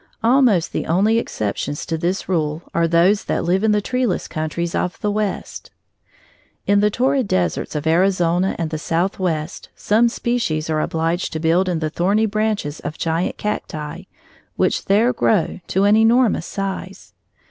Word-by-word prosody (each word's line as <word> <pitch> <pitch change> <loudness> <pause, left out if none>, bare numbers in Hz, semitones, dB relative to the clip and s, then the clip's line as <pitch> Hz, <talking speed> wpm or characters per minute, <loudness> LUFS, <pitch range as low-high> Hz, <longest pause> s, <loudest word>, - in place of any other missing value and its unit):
Almost 235 -7 +3
the - - -2
only 205 +7 +3
exceptions 130 - -3
to 165 - -2
this 175 +4 -2
rule 160 -2 -1
are 170 0 +2
those 175 +5 +3
that - - -1
live 180 +4 +1
in 220 - +3
the 210 0 +2
treeless 250 -5 -1
countries 160 +2 -3
of 180 - -2
the 210 - 0
West. 210 -1 -3 1.0
In 200 0 +3
the 210 +1 +3
torrid 260 +2 +1
deserts 90 - -1
of 150 0 -3
Arizona 180 +1 +2
and 165 -2 -3
the 155 - -3
Southwest, 170 -1 -2
some 225 +3 +2
species 200 -11 -1
are 155 -1 +1
obliged 165 +3 -1
to 160 - -3
build 170 +4 +2
in 175 - 0
the 155 -1 -2
thorny 200 +7 +1
branches 215 -8 -1
of 155 - -6
giant 165 +2 -1
cacti, 155 -7 -4 0.5
which - - 0
there 220 +6 +3
grow 215 -6 +1
to 190 - +1
an 205 +1 +5
enormous 225 +1 +3
size. 195 -1 -5
185 Hz, 160 wpm, -20 LUFS, 160-210 Hz, 1.0 s, an